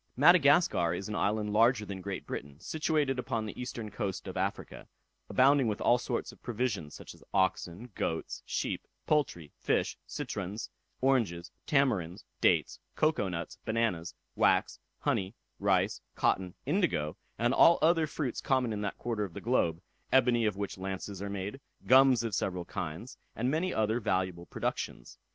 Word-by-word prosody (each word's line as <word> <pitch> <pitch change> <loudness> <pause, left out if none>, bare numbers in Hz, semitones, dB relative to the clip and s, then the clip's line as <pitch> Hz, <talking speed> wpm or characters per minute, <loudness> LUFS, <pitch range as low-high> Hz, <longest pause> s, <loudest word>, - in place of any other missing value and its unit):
Madagascar 145 - +5
is 100 - -5
an 105 - -4
island 105 0 0
larger 115 0 +4
than 95 -2 -6
Great 100 0 -5
Britain, 70 +1 -6
situated 150 - 0
upon 115 -3 -2
the 105 - -6
eastern 115 -3 -5
coast 100 -2 -4
of 95 - -6
Africa, 95 +2 -3 0.4
abounding 135 0 +4
with 105 -2 -1
all 120 +1 +4
sorts 120 -1 -3
of - - -19
provisions, 110 -10 -2
such - - -10
as - - -18
oxen, 95 +3 0
goats, 80 -2 -3
sheep, - - -3 0.2
poultry, 90 - 0
fish, - - 0
citrons, 100 +3 -5 0.3
oranges, 110 -10 +1 0.2
tamarinds, 100 - +1 0.2
dates, - - +3 0.2
cocoa 155 -11 +2
nuts, 85 -2 -5
bananas, 110 -7 -1 0.2
wax, - - +2 0.2
honey, 95 +4 0 0.2
rice, 100 0 +2
cotton, 90 -2 +1
indigo, 75 0 0 0.2
and 120 +3 +2
all 170 +4 +7
other 165 -1 +4
fruits 145 -4 -3
common 130 -4 +1
in 105 - -3
that 100 -1 -3
quarter 115 -3 -2
of 95 -5 -6
the - - -4
globe; 90 -8 +1 0.3
ebony 120 -3 +4
of 100 -2 -2
which 100 -1 -4
lances 95 0 -5
are 100 - -3
made, 100 +6 -5 0.2
gums 130 -2 +6
of 115 -2 -3
several 90 -2 -1
kinds, 90 +11 -6 0.2
and 125 +3 0
many 170 +5 0
other 110 -1 +1
valuable 95 -4 -1
productions. - - -4
105 Hz, 155 wpm, -31 LUFS, 95-125 Hz, 0.4 s, all